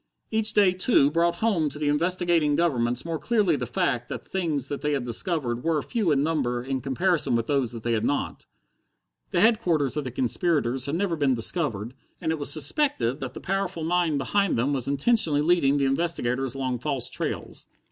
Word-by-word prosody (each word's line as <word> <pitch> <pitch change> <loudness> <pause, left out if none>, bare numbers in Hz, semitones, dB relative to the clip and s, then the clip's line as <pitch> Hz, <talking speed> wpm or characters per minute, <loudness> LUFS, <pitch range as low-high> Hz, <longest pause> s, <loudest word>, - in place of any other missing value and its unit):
Each 220 -1 +1
day, 200 -4 +4
too, 185 - +3
brought 170 +2 +2
home 170 -6 +1
to 150 - -8
the 150 -1 -2
investigating 165 0 +1
governments 125 -7 0
more 165 -2 -3
clearly 210 -8 +2
the 125 -3 -4
fact 120 0 -1
that - - -5
the - - -24
things 160 -8 -1
they 145 +1 -2
had 135 -4 -2
discovered 125 - -1
were 165 -2 +1
few 220 -8 -1
in 140 -1 +2
number 130 -6 -1
in 135 0 -3
comparison 150 +1 +1
with 115 -1 0
those 135 -4 0
they 115 0 -3
had 110 -1 0
not. 145 - -2 0.8
The 175 - +1
headquarters 175 - +2
of 150 - -1
the 130 - -4
conspirators 130 0 0
had 140 - -1
never 180 -1 0
been 140 -4 +1
discovered, 115 - -1 0.3
and 160 - -1
it 160 - -2
was 145 - -2
suspected 145 - 0
that 130 -3 -6
the - - -7
powerful 195 -3 -2
mind 170 -2 +1
behind 195 +7 +1
them 130 +5 +1
was 130 -3 -1
intentionally 150 - +2
leading 150 -4 +3
the 140 - +1
investigators 135 -4 -1
along 130 -2 -2
false 135 -1 -2
trails. - - -5
150 Hz, 190 wpm, -25 LUFS, 130-175 Hz, 0.8 s, day